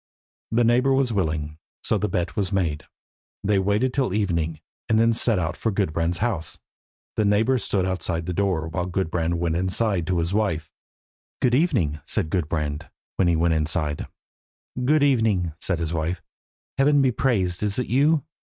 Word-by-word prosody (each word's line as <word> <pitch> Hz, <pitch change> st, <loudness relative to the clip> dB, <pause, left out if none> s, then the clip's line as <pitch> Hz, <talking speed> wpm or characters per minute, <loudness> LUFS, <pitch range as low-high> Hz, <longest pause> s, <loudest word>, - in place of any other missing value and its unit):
The 120 Hz, +2 st, +3 dB
neighbour 125 Hz, +4 st, +3 dB
was 135 Hz, -3 st, +1 dB
willing, 80 Hz, -5 st, -2 dB, 0.2 s
so -, -, +1 dB
the 105 Hz, -, -1 dB
bet 90 Hz, -3 st, -2 dB
was 100 Hz, -2 st, -1 dB
made. 80 Hz, -6 st, -1 dB, 0.6 s
They 100 Hz, -1 st, +2 dB
waited 105 Hz, +7 st, +1 dB
till 130 Hz, -9 st, 0 dB
evening, 85 Hz, -6 st, -1 dB, 0.3 s
and 110 Hz, -, +3 dB
then 115 Hz, +1 st, +4 dB
set 115 Hz, -1 st, +3 dB
out 85 Hz, -2 st, -1 dB
for 115 Hz, -, -1 dB
Gudbrand's 85 Hz, -3 st, 0 dB
house. 105 Hz, -7 st, -2 dB, 0.6 s
The 110 Hz, -, +3 dB
neighbour 110 Hz, +6 st, +3 dB
stood 95 Hz, -3 st, 0 dB
outside 85 Hz, -2 st, -2 dB
the 90 Hz, -, -3 dB
door, 90 Hz, -4 st, 0 dB
while 90 Hz, +2 st, -3 dB
Gudbrand 85 Hz, -2 st, -1 dB
went 85 Hz, -1 st, -1 dB
inside 95 Hz, 0 st, 0 dB
to 90 Hz, -1 st, +1 dB
his 85 Hz, +2 st, -1 dB
wife. 90 Hz, -8 st, -1 dB, 0.7 s
"Good 125 Hz, -, +2 dB
evening," 90 Hz, -, +2 dB
said 80 Hz, -, -2 dB
Gudbrand, 75 Hz, -4 st, -2 dB, 0.3 s
when 95 Hz, -, +3 dB
he 85 Hz, -, +3 dB
was 85 Hz, +1 st, +2 dB
inside. 75 Hz, -1 st, -1 dB, 0.8 s
"Good 150 Hz, +3 st, +3 dB
evening," 110 Hz, -, +2 dB
said 90 Hz, -, 0 dB
his 80 Hz, -1 st, -3 dB
wife. 85 Hz, +2 st, -2 dB, 0.6 s
"Heaven 145 Hz, 0 st, +4 dB
be 130 Hz, -, +3 dB
praised. 100 Hz, -9 st, 0 dB
Is 105 Hz, -1 st, 0 dB
it 125 Hz, -, 0 dB
you?" 145 Hz, +4 st, +2 dB
95 Hz, 170 wpm, -24 LUFS, 80-115 Hz, 0.8 s, then